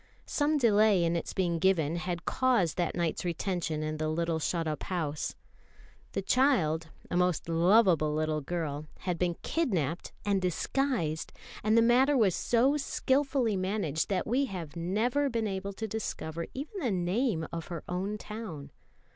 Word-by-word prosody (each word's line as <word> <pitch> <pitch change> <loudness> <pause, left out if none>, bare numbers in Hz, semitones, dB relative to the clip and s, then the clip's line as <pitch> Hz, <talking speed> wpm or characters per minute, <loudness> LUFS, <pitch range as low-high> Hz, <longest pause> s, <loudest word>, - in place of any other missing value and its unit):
Some 300 +1 +1
delay 215 -6 +4
in 170 0 +1
its 170 - -2
being 175 -3 0
given 165 -3 +2
had 175 -1 -4
caused 240 -11 +2
that 175 -2 0
night's 170 0 -1
retention 170 -3 -2
in 155 0 -3
the 155 0 -1
little 165 0 0
shut 165 +1 -1
up 155 -1 -3
house. 155 -5 -3 0.8
The 195 - -2
child, 180 - +2 0.2
a - - 0
most 180 -3 +1
lovable 170 -1 +4
little 155 0 0
girl, 155 -1 -3
had 180 -3 -2
been 175 -1 +1
kidnapped 175 - -1
and 200 -2 +2
disguised; 180 - -1 0.3
and 215 +2 +3
the 230 - +6
matter 260 +4 +4
was 205 -7 +4
so 255 - +2
skilfully 270 -5 +1
managed, 185 -5 -1
that 195 - 0
we 260 +5 +1
have 175 - -6
never 225 +12 +1
been 230 -3 -1
able 195 0 -4
to 220 +3 -4
discover 170 -6 -4
even 300 +10 -5
the 265 -9 0
name 185 - 0
of 165 -1 -4
her 170 -2 -6
own 190 +4 -2
town. 200 -11 -7
185 Hz, 160 wpm, -30 LUFS, 165-230 Hz, 0.8 s, the